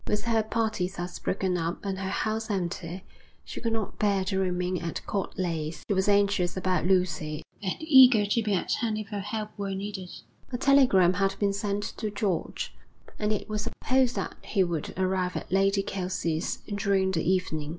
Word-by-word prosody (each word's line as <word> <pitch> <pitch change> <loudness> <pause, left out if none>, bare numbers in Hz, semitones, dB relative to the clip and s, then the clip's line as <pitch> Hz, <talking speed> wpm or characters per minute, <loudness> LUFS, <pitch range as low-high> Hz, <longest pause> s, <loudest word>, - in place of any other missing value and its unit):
With 210 - 0
her 230 -1 +2
party 220 -3 0
thus 180 -2 -6
broken 185 -2 0
up 170 +4 -3
and 190 -1 -2
her 190 -1 -2
house 220 +3 -1
empty, 180 -2 -3 0.4
she - - -7
could 230 - -1
not 225 -3 -3
bear 200 -2 +2
to 190 0 0
remain 180 -1 0
at 170 -1 -5
Court 200 0 -3
Leys. 165 -4 -2
She - - +1
was 190 0 +1
anxious 200 -3 +2
about 185 -1 +1
Lucy 160 -5 +1 0.2
and 190 -3 -1
eager 260 -8 +7
to 205 +3 +1
be 210 -2 +1
at 180 - -2
hand 220 -2 0
if 215 -2 -5
her 205 -2 -3
help 210 +2 -4
were 195 -1 -2
needed. 195 -2 -5 0.4
A 245 - -1
telegram 250 -10 +5
had 195 +1 0
been 200 -1 +1
sent 200 0 -2
to 215 - -2
George, 205 -5 -2 0.5
and 210 0 0
it 210 - -2
was 215 -1 -2
supposed 255 +3 +1
that - - -3
he 195 -3 +1
would 170 -4 -2
arrive 185 -1 0
at - - -5
Lady 195 +1 +3
Kelsey's 180 -4 -2 0.2
during 195 -2 +2
the 165 - 0
evening. 180 -5 0
195 Hz, 190 wpm, -28 LUFS, 180-210 Hz, 0.5 s, eager